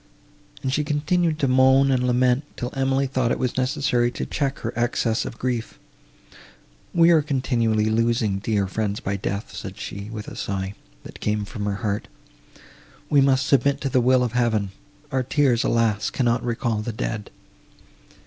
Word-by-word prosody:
and 130 - -1
she 150 - +1
continued 155 +3 0
to 140 - +1
moan 130 +1 +5
and 125 -1 +1
lament, 125 +2 +2
till 125 +1 -4
Emily 135 0 +1
thought 130 -3 0
it 125 -2 -1
necessary 130 -2 +1
to 120 - -5
check 140 -2 -2
her 115 - -4
excess 120 -1 0
of 115 - -7
grief. 120 -3 -3 1.1
"We 170 0 +5
are 160 -2 +5
continually 120 -6 0
losing 110 -2 +1
dear 105 -1 0
friends 100 +2 -2
by 100 - -2
death," 100 +1 -4
said - - -7
she, 100 +1 -6
with 110 -1 -7
a - - -8
sigh, 95 0 -3 0.3
that - - -11
came 105 -1 -1
from 105 -1 -5
her 100 -1 -1
heart. 100 0 -1 1.0
"We 145 -2 +6
must 135 -1 +3
submit 140 +1 +2
to 140 - -1
the 130 -1 +3
will 125 +1 +4
of 120 - -1
Heaven—our 120 +4 -2
tears, 130 -2 +2
alas! 110 -3 +1
cannot 120 -2 0
recall 115 -2 -1
the 115 +1 -4
dead!" 110 -1 -4
125 Hz, 165 wpm, -23 LUFS, 110-135 Hz, 1.1 s, We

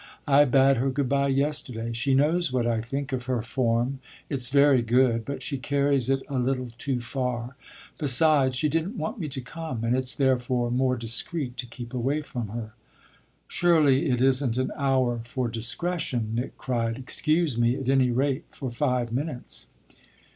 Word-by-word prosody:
I 145 +1 +6
bade 135 0 +4
her 130 +3 +1
good 135 0 -1
bye 140 0 +2
yesterday. 135 -5 -1
She 130 +3 +1
knows 155 +3 +2
what 125 -2 0
I 115 -1 0
think 135 +4 -4
of 125 -1 -3
her 125 -3 -1
form. 120 +2 0 0.3
It's 130 -4 +2
very 140 -2 +5
good, 120 -1 +2
but 140 - -5
she 140 -4 -3
carries 140 -1 +1
it 135 0 +1
a 135 -2 -2
little 130 0 -1
too 130 -1 -1
far. 125 0 -3 0.4
Besides, 140 -2 +4
she 150 +4 +1
didn't 165 - -2
want 245 - -4
me 155 -4 -3
to 135 -1 -5
come, 130 -3 -6
and 115 +2 +1
it's 130 -2 +1
therefore 125 -2 +1
more 125 0 +1
discreet 125 +4 -3
to 125 - -3
keep 120 +1 -9
away 135 +5 -1
from 120 -6 -5
her." 110 +1 -6 0.7
"Surely 155 -4 +3
it 125 -1 +1
isn't 130 -2 +2
an 130 - 0
hour 130 -4 +1
for 125 +1 -3
discretion!" 120 +1 -2
Nick 120 +3 -3
cried. 115 -3 -2
"Excuse 155 +3 0
me 120 +1 +3
at 135 -1 -5
any 135 -1 +3
rate 135 +5 0
for 130 -3 -6
five 125 -2 -1
minutes." 130 +1 -4
130 Hz, 175 wpm, -26 LUFS, 120-140 Hz, 0.7 s, I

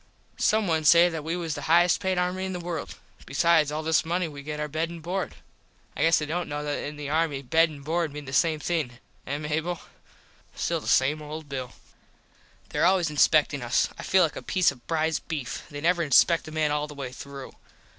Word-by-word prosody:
Some 220 -1 +2
one 160 -3 +1
say 170 +3 +7
that 160 -3 -5
we 165 +2 -2
was 170 -3 -3
the 145 - -5
highest 175 +1 +5
payed 190 -2 -1
army 180 +1 0
in 190 0 -3
the 180 - -4
world. 175 -1 -5 0.3
Besides 165 -3 +3
all 155 +1 -3
this 160 0 +2
money 175 +2 -1
we 145 -2 -9
get 150 +1 -5
our 150 - -2
bed 160 +3 -2
and 170 0 -8
board. 180 +4 -3 0.6
I - - -4
guess 165 +1 +5
they 150 - -1
dont 170 +3 -3
know 145 0 -3
that 145 -1 -3
in 150 - -5
the 145 -1 -5
army 150 -2 0
bed 165 +5 +3
and 140 -3 -11
board 165 0 0
mean 150 0 -8
the 130 - -8
same 155 +2 +2
thing. 155 -6 -1 0.3
Eh, 140 +3 -2
Mable? 160 +3 -2 0.8
Still - - -1
the - - -10
same 145 +4 +3
old 150 +1 -7
Bill. 130 -2 -5 1.0
There - - -1
always 175 -3 +3
inspectin 150 -1 +3
us. 120 +2 +1
I - - -9
feel 190 -1 +3
like 160 - -1
a - - -6
piece 185 -5 +2
of 125 -3 -16
prize 160 -1 0
beef. 145 -7 -5
They 145 0 -7
never 175 +2 +2
inspect 165 +3 +4
a - - -7
man 155 -1 0
all 150 0 -1
the 150 - -10
way 135 -3 -5
through. 140 +1 -9
155 Hz, 225 wpm, -26 LUFS, 145-170 Hz, 1.0 s, say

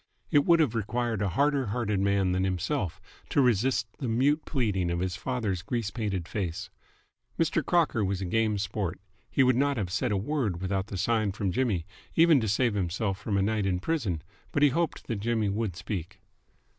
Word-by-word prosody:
It 145 -1 +4
would 170 -1 +5
have 145 -8 +3
required 115 0 -1
a 100 - +1
harder 140 +5 +1
hearted 105 -2 -1
man 100 -1 +2
than 95 +1 +1
himself 95 - -1 0.3
to - - +1
resist 125 -1 +3
the 130 - -2
mute 135 +7 +2
pleading 105 - 0
of 85 0 -1
his 90 -1 -1
father's 105 -4 -2
grease 115 +2 -2
painted 100 -7 -2
face. 90 -5 -4 0.7
Mr. 165 0 +1
Crocker 160 -9 +2
was 95 -1 -1
a 95 - -3
game 110 +3 +1
sport: 95 -2 -3 0.3
he 135 - +3
would 130 -1 +4
not 140 +1 +2
have 95 -5 -2
said 110 +5 0
a 100 - +2
word 110 - -1
without 95 +1 -1
the 100 - -5
sign 105 +1 +1
from 100 -1 -1
Jimmy, 105 -8 0 0.3
even 165 -3 +6
to 110 - -1
save 115 +3 +2
himself 95 +1 -1
from 100 -1 -1
a 95 - +2
night 105 -1 0
in 90 -2 0
prison, 95 - -1 0.3
but 145 - +2
he 145 - +7
hoped 165 +4 -1
that 115 - -2
Jimmy 110 -1 0
would 100 -3 -2
speak. 90 -1 -5
105 Hz, 195 wpm, -28 LUFS, 95-125 Hz, 0.7 s, he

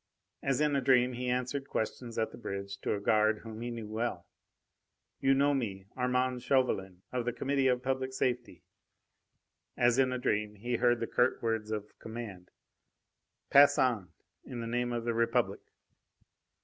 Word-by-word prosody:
As 135 +1 0
in 150 -1 +2
a 140 - +2
dream 125 -1 +4
he 125 +1 -3
answered 125 +3 -2
questions 115 +1 -3
at 110 -1 0
the - - -11
bridge 100 -3 -5
to - - -1
a - - -3
guard 110 +1 +2
whom 110 -1 -8
he 120 - -3
knew 115 -2 -5
well. 110 -4 -3 0.9
"You 135 0 +4
know 140 +1 +3
me 100 -8 -2
Armand 125 0 0
Chauvelin, 95 -9 0
of 125 -1 -1
the 120 - -1
Committee 135 +2 +1
of 125 -1 +1
Public 130 0 -1
Safety!" 125 -8 -2 1.1
As 120 +1 +4
in 130 -1 +4
a 130 - -1
dream, 105 -3 -1
he 120 +4 -2
heard 120 0 +3
the - - +1
curt 125 +2 +1
words 110 -2 -1
of 105 -1 -5
command: 110 -6 -7 1.0
"Pass 140 0 +7
on, 115 -8 +1 0.3
in 125 - -7
the 115 - -4
name 120 +1 -1
of 120 -1 -3
the 120 - 0
Republic!" 115 0 +1
120 Hz, 170 wpm, -31 LUFS, 110-130 Hz, 1.1 s, Pass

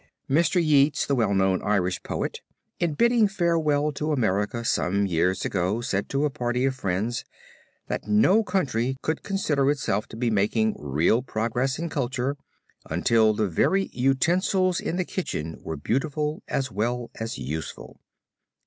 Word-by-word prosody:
Mr. 165 +5 +3
Yeats, 150 -3 +3
the 140 - 0
well 110 -6 +2
known 95 -1 +2
Irish 95 -3 0
poet, - - -4 0.4
in 165 -4 0
bidding 235 +2 +4
farewell 165 -6 +1
to 150 +2 -2
America 110 -3 0
some 100 -1 +1
years 90 +1 0
ago 95 +4 0
said 100 -4 -2
to 140 +2 +1
a 150 - 0
party 125 -2 -1
of 135 - +1
friends, 110 0 -2 0.6
that - - -4
no 145 - +4
country 135 - -1
could 160 - -1
consider 150 -9 0
itself 130 -8 0
to - - -10
be 120 0 0
making 110 +1 +1
real 75 - +2
progress 120 +2 -1
in 170 +2 -3
culture 135 -2 -2 0.5
until 110 -2 +3
the 105 0 +1
very 195 - +1
utensils 175 +7 +2
in - - -3
the 180 0 -1
kitchen 80 - -4
were 80 - -5
beautiful 150 - -1
as 135 -1 -2
well 120 +4 -2
as 115 +3 -4
useful. 75 +5 -6
125 Hz, 150 wpm, -25 LUFS, 105-150 Hz, 0.6 s, bidding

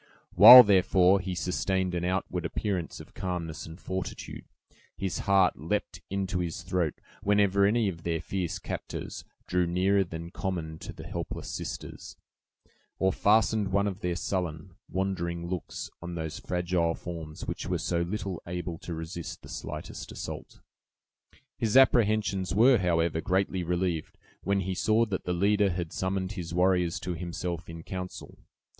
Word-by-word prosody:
While, 120 +7 +12
therefore, 95 -2 +4
he 95 0 -4
sustained 90 +2 -1
an 85 -1 -1
outward 90 -1 -1
appearance 90 0 -3
of - - -12
calmness 90 -4 -4
and 80 +2 -10
fortitude, 95 -1 -5 0.5
his 95 -2 -2
heart 95 -2 +4
leaped - - -2
into 95 -1 -1
his 85 0 -3
throat, 90 -3 -1 0.3
whenever 100 -1 +3
any 110 +1 +2
of 85 -4 -4
their 85 -1 -1
fierce 85 +1 -3
captors - - -6 0.2
drew 90 -1 +1
nearer 95 +3 +2
than 85 -1 -7
common 80 -5 -4
to - - -7
the - - -10
helpless - - -5
sisters, - - -7 0.8
or 95 -1 +2
fastened 105 -1 +3
one 100 +1 +2
of 100 -1 -3
their 90 -3 -1
sullen, 90 -1 -3 0.2
wandering 85 -3 -2
looks 90 -1 -5
on 85 0 -6
those 80 -2 -4
fragile 90 -2 0
forms 80 -3 -7
which - - -4
were - - 0
so 85 -1 -1
little 95 0 -3
able 85 -1 -4
to 85 - -6
resist 80 +1 -6
the - - -11
slightest - - -7
assault. - - -7 1.0
His 115 +2 +2
apprehensions 105 -7 +3
were, 120 +2 +6
however, 85 -2 +1
greatly 95 +1 0
relieved, 90 -2 -2 0.2
when 100 0 +1
he 95 0 -2
saw 110 +4 +2
that 100 -4 -4
the 90 - 0
leader 100 +3 +3
had 85 -2 -4
summoned 95 0 -2
his 85 -4 -5
warriors 90 -2 +2
to 90 - -3
himself 85 0 -4
in 80 0 -8
counsel. 90 0 -7
90 Hz, 150 wpm, -28 LUFS, 85-95 Hz, 1.0 s, While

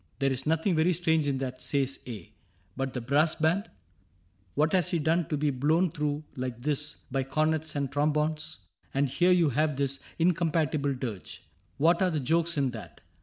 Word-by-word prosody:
— - - -42
' - - -37
There 135 0 +1
is 130 +2 -3
nothing 160 +4 +2
very 160 +3 +3
strange 160 -3 +1
in 140 -2 0
that,' 130 -1 -4
says 135 -2 0
A; 110 -4 -8 0.2
' 90 +1 -37
But 135 0 -2
the 125 - -3
brass 145 +6 +2
band? 170 +7 +1 0.9
What 155 +2 +2
has 180 -4 +3
he 170 - +1
done 160 +1 +1
to 150 - -1
be 145 0 +1
Blown 155 +7 +2
through 150 0 -2
like 125 -2 -4
this 150 +3 -1 0.2
by 135 +1 +1
cornets 155 +3 0
and 140 -2 -1
trombones? 155 +2 0 0.4
And 140 +1 +3
here 175 +8 +3
you 175 -4 +4
have 150 +3 +1
this 140 0 -1 0.2
incompatible 160 -4 +1
dirge 115 -7 -6 0.2
— 95 -1 -39
Where 170 +4 +3
are 185 - +4
the 160 -3 -1
jokes 165 +4 +1
in 135 -3 +1
that 105 -10 -10
150 Hz, 200 wpm, -28 LUFS, 135-160 Hz, 0.9 s, you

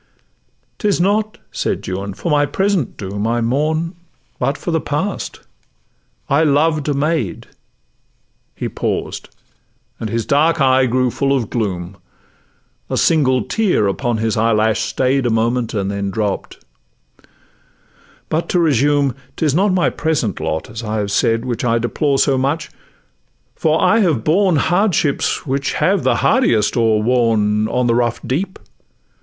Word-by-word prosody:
''Tis 205 -5 +1
not,' 210 +4 +1
said - - -3
Juan, 95 +1 -4
'for 170 - -3
my 145 -1 +3
present 190 - -1
doom 100 +1 -3
I 120 +1 0
mourn, 155 +8 0 0.5
but 140 - 0
for 175 - -4
the 160 -1 +1
past;—I 145 - -5
loved 150 0 +2
a 145 - 0
maid:' 140 - -1 1.1
He - - -3
paused, - - -3 0.7
and 110 - -4
his 115 +1 -2
dark 155 +3 +2
eye 130 -1 +4
grew 125 +1 +1
full 140 +2 +1
of 115 -5 -4
gloom; 95 -5 -3 0.9
A - - -1
single 130 -7 +3
tear 200 - +1
upon 115 +4 -1
his 110 0 -1
eyelash 110 -1 +2
staid 130 0 0
A - - +1
moment, 115 +1 0
and 100 -1 -1
then 100 -1 -2
dropp'd; 100 0 -3 1.7
'but 160 +2 -2
to 180 - +2
resume, 145 -3 +2 0.2
'Tis 155 -4 0
not 195 +5 +2
my 185 -1 +2
present 150 - -1
lot, 80 0 -3
as 110 +1 -7
I 110 0 -2
have 100 -1 -2
said, 115 +3 +1
Which 120 -2 -3
I 115 -1 +2
deplore 135 +4 0
so 135 -1 +2
much; 145 +4 -1 0.8
for 160 0 +1
I 225 - +4
have 160 - +1
borne 185 +2 +3
Hardships 175 -2 +1
which 135 -1 -1
have - - +1
the - - +2
hardiest 110 -2 +2
overworn, 110 -2 +2
'On 125 +2 0
the 120 - +2
rough 120 0 0
deep. 185 +9 -2
130 Hz, 145 wpm, -18 LUFS, 110-155 Hz, 1.7 s, eye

